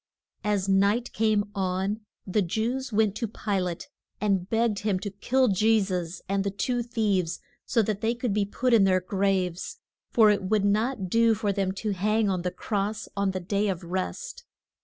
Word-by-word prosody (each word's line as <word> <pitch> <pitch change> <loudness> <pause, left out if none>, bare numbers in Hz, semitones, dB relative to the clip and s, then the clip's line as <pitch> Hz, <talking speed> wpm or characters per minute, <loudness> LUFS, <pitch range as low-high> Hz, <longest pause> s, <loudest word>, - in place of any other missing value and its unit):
] - - -47
As 195 -2 0
night 200 +5 +2
came 215 -1 +1
on 190 +2 -1 0.2
the 205 +2 +1
Jews 235 +8 -2
went 215 -2 +2
to 230 - -2
Pi 205 -2 -2
late 180 -2 -3 0.3
and 195 -3 0
begged 225 -2 +1
him 210 -3 0
to 205 +1 -5
kill 255 +6 +1
Je 215 +3 +4
sus 180 -3 -3
and 195 0 0
the 200 - 0
two 245 +5 -1
thieves 205 -7 0 0.3
so 230 - +3
that 210 0 -2
they 230 +1 +1
could 240 -3 -2
be 205 0 +2
put 240 +5 0
in 215 -4 +6
their 185 -1 +4
graves. 190 - -1 0.3
For 220 -3 +6
it 200 -1 +1
would 200 +1 +1
not 215 0 +1
do 230 +3 +4
for 205 -1 -1
them 195 -1 0
to 210 +2 -3
hang 210 +2 +1
on 185 -2 -1
the 180 - -1
cross 210 +3 -3
on 200 -1 +1
the 190 0 -2
day 200 +3 0
of 185 -2 -2
rest. 475 - -4
205 Hz, 195 wpm, -27 LUFS, 190-220 Hz, 0.3 s, in